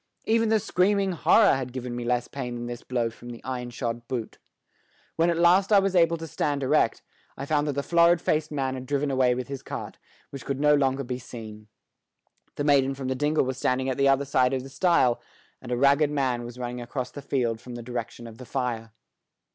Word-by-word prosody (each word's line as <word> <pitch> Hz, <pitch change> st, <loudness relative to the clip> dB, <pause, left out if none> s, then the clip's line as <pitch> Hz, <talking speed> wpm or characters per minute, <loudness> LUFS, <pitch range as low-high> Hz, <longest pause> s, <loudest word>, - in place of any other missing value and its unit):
Even 225 Hz, 0 st, +2 dB
the 220 Hz, 0 st, +3 dB
screaming 200 Hz, -1 st, +1 dB
horror 200 Hz, +4 st, +5 dB
had 130 Hz, -2 st, -3 dB
given 125 Hz, -1 st, -5 dB
me 120 Hz, -, -4 dB
less 120 Hz, 0 st, 0 dB
pain 125 Hz, -3 st, -5 dB
than 120 Hz, 0 st, -5 dB
this 120 Hz, 0 st, -6 dB
blow 120 Hz, -2 st, -1 dB
from 120 Hz, +2 st, -12 dB
the 120 Hz, -1 st, -9 dB
iron 125 Hz, -2 st, -4 dB
shod 120 Hz, -1 st, -4 dB
boot. 120 Hz, -4 st, -5 dB, 0.8 s
When 165 Hz, +1 st, +2 dB
at 170 Hz, -, 0 dB
last 180 Hz, +4 st, +4 dB
I 205 Hz, -, +7 dB
was 195 Hz, -1 st, +2 dB
able 170 Hz, -1 st, +4 dB
to 165 Hz, -, -7 dB
stand 145 Hz, -2 st, -2 dB
erect, 130 Hz, -, +2 dB, 0.3 s
I 140 Hz, -, -5 dB
found 150 Hz, 0 st, +1 dB
that 145 Hz, -, 0 dB
the 140 Hz, +1 st, -2 dB
florid 170 Hz, +1 st, +4 dB
faced 155 Hz, -1 st, 0 dB
man 135 Hz, -3 st, -1 dB
had 130 Hz, -1 st, -7 dB
driven 140 Hz, +1 st, 0 dB
away 130 Hz, -2 st, +3 dB
with 125 Hz, 0 st, -4 dB
his 135 Hz, -1 st, -6 dB
cart, -, -, -7 dB, 0.3 s
which 140 Hz, -, -8 dB
could 140 Hz, -1 st, -3 dB
no 150 Hz, 0 st, +4 dB
longer 135 Hz, -1 st, +1 dB
be 125 Hz, 0 st, -4 dB
seen. 110 Hz, -4 st, -10 dB, 0.9 s
The 145 Hz, -, -2 dB
maiden 135 Hz, -2 st, +3 dB
from 135 Hz, -1 st, -4 dB
the -, -, +1 dB
dingle 150 Hz, +2 st, +1 dB
was 130 Hz, 0 st, -4 dB
standing 130 Hz, +1 st, 0 dB
at 130 Hz, -, -2 dB
the 140 Hz, 0 st, +4 dB
other 135 Hz, +1 st, +2 dB
side 130 Hz, -1 st, +2 dB
of 130 Hz, -, -3 dB
the 135 Hz, -, -10 dB
stile, 135 Hz, -6 st, +2 dB, 0.4 s
and 125 Hz, -, -8 dB
a 120 Hz, -, 0 dB
ragged 140 Hz, +3 st, +4 dB
man 130 Hz, -5 st, -1 dB
was 120 Hz, +1 st, -9 dB
running 125 Hz, 0 st, -5 dB
across 125 Hz, +1 st, -5 dB
the 145 Hz, -, -8 dB
field 120 Hz, -5 st, -1 dB
from 125 Hz, -1 st, -9 dB
the 120 Hz, -, -7 dB
direction 120 Hz, 0 st, -6 dB
of 115 Hz, 0 st, -11 dB
the 125 Hz, -, -9 dB
fire. 115 Hz, -4 st, -3 dB
130 Hz, 225 wpm, -26 LUFS, 125-150 Hz, 0.9 s, I